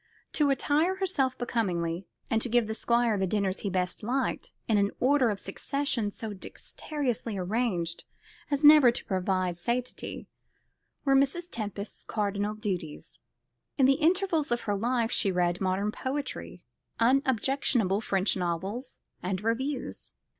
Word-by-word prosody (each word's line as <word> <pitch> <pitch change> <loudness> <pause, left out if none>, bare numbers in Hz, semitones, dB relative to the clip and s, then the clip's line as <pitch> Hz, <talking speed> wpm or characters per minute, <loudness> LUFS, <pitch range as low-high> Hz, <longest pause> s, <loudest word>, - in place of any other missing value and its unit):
To 295 -2 +3
attire 295 +7 +2
herself 320 -10 0
becomingly, 180 -7 -1 0.2
and 225 -1 +1
to 245 - -1
give 240 0 +3
the 220 - -3
Squire 235 -2 +2
the 190 - +1
dinners 195 -1 0
he 200 - -2
best 180 -1 -1
liked, 250 +4 -1 0.2
in 215 -2 +3
an 200 0 +2
order 260 -1 +4
of 205 -2 -2
succession 275 -6 -2
so 215 +1 -6
dexterously 240 +2 -4
arranged 180 -4 -1 0.4
as 285 0 0
never 295 -4 +9
to - - -4
provoke 185 -2 0
satiety, 240 +7 -3 0.8
were 275 - +4
Mrs. 290 +6 +2
Tempest's 205 -2 -5
cardinal 205 0 -1
duties. 185 -8 -5 0.6
In 270 - +5
the 270 +4 +3
intervals 335 -3 +2
of 240 - +1
her 205 - -1
life 235 +2 0
she 195 - +3
read 175 0 +1
modern 190 +2 0
poetry, 260 -8 -4 0.4
unobjectionable 250 -4 +2
French 195 -2 +1
novels, 190 +8 -3 0.2
and 185 +2 -2
reviews. 255 +4 -2
225 Hz, 140 wpm, -28 LUFS, 195-270 Hz, 0.8 s, never